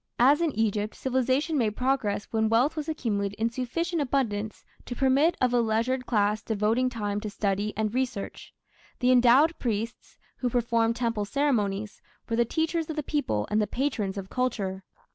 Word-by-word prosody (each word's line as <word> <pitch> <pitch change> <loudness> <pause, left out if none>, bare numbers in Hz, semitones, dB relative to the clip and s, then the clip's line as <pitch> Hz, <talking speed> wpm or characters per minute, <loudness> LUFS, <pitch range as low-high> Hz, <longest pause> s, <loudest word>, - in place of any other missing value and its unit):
As 275 +6 +5
in 330 -2 +2
Egypt, 215 -1 -1
civilization 265 +4 0
made 215 -3 0
progress 250 -6 0
when 220 -1 +1
wealth 245 +7 +3
was 305 0 -4
accumulated 205 -9 -2
in 230 +1 +1
sufficient 330 +8 -2
abundance 220 -6 -2 0.2
to 245 - -4
permit 275 +6 +3
of 250 -1 +2
a 245 - +4
leisured 235 +3 0
class 210 -2 +1
devoting 225 +4 +1
time 205 -4 -3
to 215 - -4
study 205 +1 -1
and 215 0 -1
research. 250 -5 -3 0.5
The 250 0 +3
endowed 255 +6 +5
priests, 230 0 -4 0.2
who 250 - -1
performed 230 -1 +1
temple 230 -4 -1
ceremonies, 210 -6 -1 0.3
were 230 - -1
the 235 +1 +3
teachers 320 +5 -1
of 315 - -3
the 300 - -2
people 270 - -1
and 215 +1 +3
the 210 - 0
patrons 230 -8 -2
of 195 -1 -5
culture. 200 -7 -2
235 Hz, 170 wpm, -27 LUFS, 210-265 Hz, 0.5 s, As